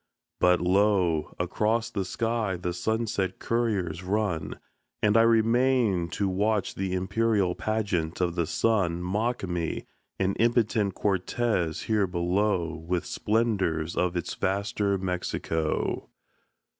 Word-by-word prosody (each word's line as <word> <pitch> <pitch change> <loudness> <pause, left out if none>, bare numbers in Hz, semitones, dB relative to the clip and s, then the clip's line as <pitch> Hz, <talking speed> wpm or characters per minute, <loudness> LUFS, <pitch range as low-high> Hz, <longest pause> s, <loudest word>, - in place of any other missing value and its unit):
But 90 -1 +4
lo, 90 -3 +2
Across 110 +6 0
the 100 -4 -2
sky 115 0 -1
the 90 0 -3
sunset 105 -2 -1
couriers 100 -8 -1
run, 95 -3 -1 0.5
And 105 0 +4
I 115 - +7
remain 115 -4 +3
To 100 +6 -1
watch 105 +1 0
the 95 -1 -3
imperial 100 0 +1
pageant 100 -7 -1
of 90 -2 +1
the 85 -2 -1
Sun 90 -3 +1
Mock 105 +3 -1
me, 85 -2 -3 0.3
an 95 0 +1
impotent 115 -4 +2
Cortez 95 -3 0
here 105 -3 +1
below, 90 -1 0
With 85 +1 -2
splendors 100 -8 0
of 90 0 0
its 85 - -3
vaster 100 +1 0
Mexico. 90 -4 -2
95 Hz, 120 wpm, -27 LUFS, 90-110 Hz, 0.5 s, I